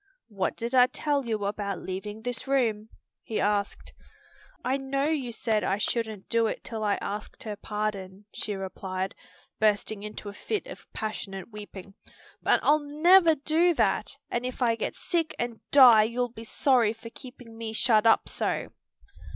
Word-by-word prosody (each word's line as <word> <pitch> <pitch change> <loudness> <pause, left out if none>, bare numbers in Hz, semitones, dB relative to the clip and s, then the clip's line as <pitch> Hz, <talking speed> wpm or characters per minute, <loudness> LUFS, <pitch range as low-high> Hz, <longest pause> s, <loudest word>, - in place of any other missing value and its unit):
"What 195 -3 -2
did 235 +2 -4
I 250 -1 +7
tell 285 -1 -1
you 215 -3 -1
about 200 -1 -2
leaving 205 +3 -6
this 245 +2 -3
room?" 225 -6 +1 0.3
he 220 - -3
asked. 205 -1 -1 0.7
"I 255 +2 +2
know 275 0 -2
you 290 -5 0
said 225 -2 0
I 195 - +1
shouldn't 220 -2 -2
do 230 -1 +2
it - - -4
till 220 -2 -5
I 205 -1 +2
asked 210 +1 -6
her 215 -2 -4
pardon," 205 -2 -4
she 210 - -3
replied, 190 0 -4 0.5
bursting 210 -1 +1
into 210 0 -7
a 200 - -6
fit 420 - -3
of - - -11
passionate 205 -2 -5
weeping, 205 -2 -10 0.5
"but - - +3
I'll 300 +1 +5
never 325 +3 +5
do 320 +4 +2
that, - - +1
and 240 - -1
if 255 0 -5
I 230 -1 +3
get - - -3
sick 335 -3 -2
and 240 -1 -3
die 250 -6 +9
you'll 245 +2 -1
be 225 0 -9
sorry 240 -2 +2
for 230 0 -11
keeping 250 -3 -12
me 225 -1 -5
shut 225 -1 +3
up 225 - +4
so." - - -2
225 Hz, 165 wpm, -27 LUFS, 210-255 Hz, 0.7 s, die